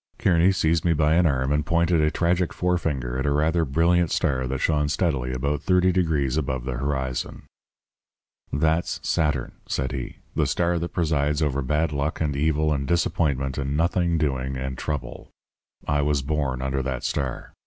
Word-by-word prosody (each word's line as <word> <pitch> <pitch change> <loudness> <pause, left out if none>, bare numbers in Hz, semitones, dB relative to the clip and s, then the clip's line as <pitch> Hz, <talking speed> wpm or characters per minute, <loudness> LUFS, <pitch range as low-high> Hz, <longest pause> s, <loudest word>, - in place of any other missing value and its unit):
"Kearny 90 +1 +4
seized 80 -3 +1
me 85 - +3
by 75 0 +2
an 85 +1 +4
arm 65 -2 0
and 75 +1 +1
pointed 85 0 +2
a 75 - +3
tragic 85 +2 0
forefinger 75 -9 -1
at 65 - -1
a - - +2
rather 80 +3 +2
brilliant 85 +4 +2
star 65 -2 0
that 65 +2 -2
shone 75 0 +1
steadily 70 -5 0
about 70 +3 -1
thirty 90 0 +3
degrees 80 -7 +1
above 65 -4 -2
the 65 -1 -3
horizon. 65 -1 -3 1.1
"'That's 80 +3 0
Saturn,' 75 -6 0
said 65 -1 -2
he, 65 -2 -5 0.2
'the - - +2
star 85 0 +1
that 85 +1 -3
presides 75 -3 0
over 70 -2 0
bad 75 +4 0
luck 70 +1 -2
and 75 -3 -1
evil 75 +1 +1
and 70 -1 -2
disappointment 70 -5 0
and 70 +1 -2
nothing 85 +1 +1
doing 65 -3 -1
and 65 0 -4
trouble. 65 -1 -5 0.6
I 75 0 +2
was 70 -1 +1
born 70 -3 -1
under 65 0 -1
that 65 -1 -3
star. 65 -4 -3
75 Hz, 175 wpm, -24 LUFS, 65-80 Hz, 1.1 s, Kearny